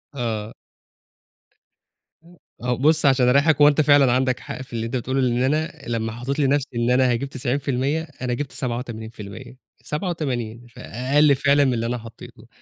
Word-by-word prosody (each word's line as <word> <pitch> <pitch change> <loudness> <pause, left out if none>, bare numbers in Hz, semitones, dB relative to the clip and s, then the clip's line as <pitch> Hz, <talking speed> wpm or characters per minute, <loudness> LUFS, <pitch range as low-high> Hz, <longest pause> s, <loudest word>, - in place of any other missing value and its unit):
آه. 110 -4 -3 1.7
م 175 +1 -18 0.3
أهو 125 -1 0
بُصّ 155 +3 +4
عشان 130 -2 +4
أريّحك، 140 +3 +3
هو 145 - +8
أنت 150 +1 +4
فعلًا 145 -3 +5
عندك 130 0 +1
حق - - -7
في 130 - -12
اللي 115 0 -2
أنت 115 - -4
بتقوله، 130 +2 -1
لإن 125 0 +1
أنا 155 +4 0 0.2
لمّا 115 -1 -2
حطّيت 125 +6 -4
لنفْسي 140 0 +2
إن 120 +1 +1
أنا 125 0 +3
هاجيب 120 +3 -2
90%، 135 +2 -1 0.2
أنا 125 -1 -1
جِبت 135 +2 -4
87% 120 -2 -6 0.3
87، 130 - -4
فأقل 140 +6 +1
فعلًا 140 +1 +3
من 130 - +1
اللي 115 0 -2
أنا 125 +1 -2
حطّيته، 115 -1 -13
130 Hz, 160 wpm, -22 LUFS, 120-140 Hz, 1.7 s, هو